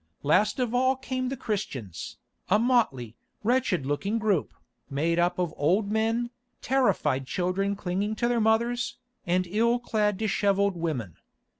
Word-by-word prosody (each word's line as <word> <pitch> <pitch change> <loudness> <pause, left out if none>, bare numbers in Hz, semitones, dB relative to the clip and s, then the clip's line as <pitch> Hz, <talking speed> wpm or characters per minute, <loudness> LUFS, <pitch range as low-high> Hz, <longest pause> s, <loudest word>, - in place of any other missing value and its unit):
Last 180 +9 +3
of 245 -2 0
all 260 +1 +3
came 255 -1 -3
the 270 - -4
Christians, 130 - -4 0.3
a 200 - +5
motley, 215 - +1 0.3
wretched 230 - +1
looking 195 +10 -1
group, 210 -7 +1 0.4
made 160 +5 0
up 175 +1 +2
of 175 -3 -1
old 190 +8 +1
men, 225 +2 0 0.3
terrified 200 - +1
children 185 +5 0
clinging 200 +3 -2
to 235 - 0
their 240 -1 +1
mothers, 235 +2 +1 0.3
and 180 +1 +2
ill 225 +6 +2
clad, 210 -4 0
dishevelled 200 -2 +1
women. 145 - -3
205 Hz, 140 wpm, -27 LUFS, 175-235 Hz, 0.4 s, a